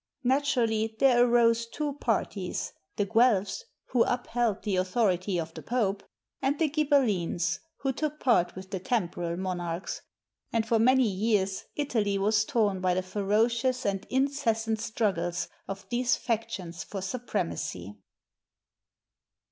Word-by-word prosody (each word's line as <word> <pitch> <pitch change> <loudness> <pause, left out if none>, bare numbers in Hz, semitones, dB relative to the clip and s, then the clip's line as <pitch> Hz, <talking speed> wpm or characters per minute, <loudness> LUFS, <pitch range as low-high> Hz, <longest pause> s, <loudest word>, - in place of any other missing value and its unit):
Naturally, 240 -5 +1
there 245 -1 +5
arose 235 -1 +3
two 295 +4 -3
parties: 215 -8 -2 0.2
the 205 - +1
Guelphs, 215 -3 +2 0.2
who 245 - +2
upheld 240 -3 0
the 200 -3 0
authority 185 -1 +1
of 165 0 -5
the - - -8
Pope; 205 -5 0 0.4
and 275 +2 +1
the 315 -2 +1
Ghibellines, 210 - +1 0.2
who 270 -1 0
took 305 +3 -3
part 235 -9 +2
with 190 +1 -9
the 190 - -2
temporal 175 -5 -1
mon 185 -1 -2
archs; 170 +1 -4 0.5
and 225 -1 0
for 225 0 +3
many 255 +2 +5
years 195 -1 0
Italy 220 -9 0
was 210 +2 +2
torn 210 -8 +1
by 180 -1 +2
the 185 - 0
ferocious 225 +6 +1
and 195 -1 -1
incessant 235 -5 0
struggles 190 -6 -1 0.2
of 195 0 -6
these 245 +1 +2
factions 195 -8 -3
for 195 +5 -6
supremacy. 100 - -3
220 Hz, 130 wpm, -28 LUFS, 190-245 Hz, 0.5 s, there